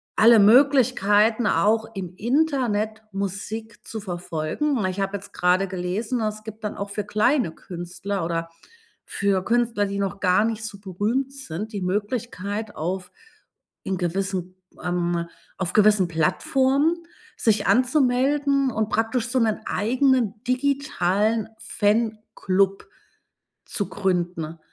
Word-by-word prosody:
alle 230 0 +7
Möglichkeiten 230 -2 +4
auch 220 +1 +2
im 185 -3 -6
Internet 235 -3 0
Musik 205 +3 -5
zu 220 - -5
verfolgen. 180 - -2
Ich 185 +1 -2
habe 195 +1 -1
jetzt 200 +1 -13
grade 180 +2 +2
gelesen, 195 +6 -2
es 215 0 -3
gibt 220 0 -9
dann 210 - -4
auch 200 0 -4
für 205 +1 -3
kleine 215 - +1
Künstler 175 +3 -5
oder 165 0 -2 0.6
für 200 -2 0
Künstler, 235 -2 +1
die 200 0 -3
noch 200 0 -2
gar 185 +2 +3
nicht 225 -1 -2
so 205 -2 -6
berühmt 210 +8 -1
sind, 220 -5 -6
die 200 - -3
Möglichkeit 205 +1 -3
auf 180 +4 -3 0.7
in 190 - -2
gewissen, 185 +1 -2 0.3
ähm, 175 -1 -1 0.3
auf 185 -2 -2
gewissen 210 -3 +5
Plattformen 265 - +2 0.4
sich 220 -2 +2
anzumelden 270 +1 +2
und 220 -1 -1
praktisch 225 +2 0
so 260 0 +1
'nen 220 -3 +1
eigenen 245 -1 +1
digitalen 230 -6 0
Fanclub 205 -3 0 0.8
zu 205 - -2
gründen, 175 -4 -2
210 Hz, 120 wpm, -24 LUFS, 190-235 Hz, 0.8 s, alle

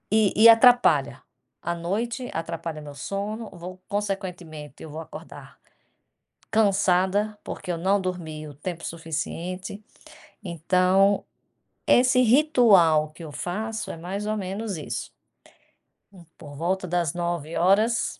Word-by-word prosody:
E 215 -2 +4
e 225 +2 +8
atrapalha. 245 +2 +5 0.4
À 170 - -2
noite 225 +9 -3
atrapalha 165 -1 -4
meu 145 -1 -9
sono. 205 - -4
Vou, 185 +2 -9
consequentemente, 180 -8 -5
eu 160 - -9
vou 155 +2 -7
acordar 160 - -11 0.9
cansada, 200 0 +2
porque 180 - -5
eu 170 - -2
não 190 +4 +1
dormi 160 -4 -5
o 145 - -10
tempo 170 +3 -6
suficiente. 170 +4 -5 0.6
Então, 185 +3 +2 0.6
esse 250 0 +5
ritual 220 - +5
que 165 - -12
eu 155 - -8
faço 215 +8 -4
é - - -8
mais 190 +5 -5
ou 215 - 0
menos 195 0 -4
isso. 150 - -5 1.0
Hum, 180 -4 -16
por 145 -3 -11
volta 185 +5 -1
das 170 -3 0
21h. 175 +6 +1
185 Hz, 120 wpm, -25 LUFS, 165-210 Hz, 1.0 s, e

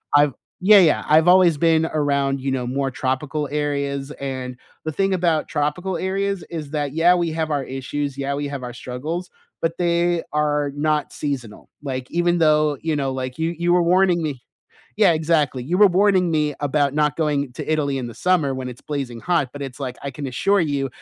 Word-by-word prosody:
I've 145 0 +5 0.3
yeah, 205 +2 +7
yeah, 165 -5 +4
I've 155 +2 +5
always 180 -3 +6
been 160 0 +3
around, 140 -3 0
you 135 - -2
know, 130 -2 -1
more 135 +2 -1
tropical 135 +4 -2
areas, 140 -2 -2
and 130 -2 -5 0.3
the 155 - -1
thing 195 +5 0
about 170 -4 +1
tropical 160 +5 -2
areas 195 +1 -2
is 155 -4 -6
that, 145 -3 -2
yeah, 165 +3 +5
we 170 -2 0
have 160 -1 -2
our 145 -2 0
issues, 135 +2 -4
yeah, 140 0 -2
we 145 +1 -2
have 140 -2 -6
our 120 -1 -6
struggles, 150 +9 -5 0.3
but 165 0 -1
they 175 -1 +1
are 150 -1 +1
not 150 0 0
seasonal, 125 -7 -5
like, 130 -2 -4
even 175 0 +1
though, 155 -2 +3
you 160 -1 -1
know, 135 -2 -1
like, 130 -1 -5
you 160 +1 0
you 175 +1 +1
were 175 0 +4
warning 180 0 +3
me 140 -5 -4 0.6
Yeah, 205 -5 +5
exactly. 155 -5 +1
You 165 +9 -1
were 205 -1 +8
warning 190 -4 +3
me 150 -2 0
about 145 -1 +1
not 150 -1 +1
going 145 -4 0
to 155 - -5
Italy 140 -3 0
in 125 - -4
the 120 - -8
summer 160 -1 +1
when 130 -1 -5
it's 125 - -11
blazing 130 -5 -3
hot, 170 -7 0
but 145 - -7
it's 135 0 -7
like, 130 -2 -4
I 140 - -4
can 140 +1 -6
assure 195 +10 +1
you, 140 -4 -1
150 Hz, 205 wpm, -22 LUFS, 135-170 Hz, 0.6 s, were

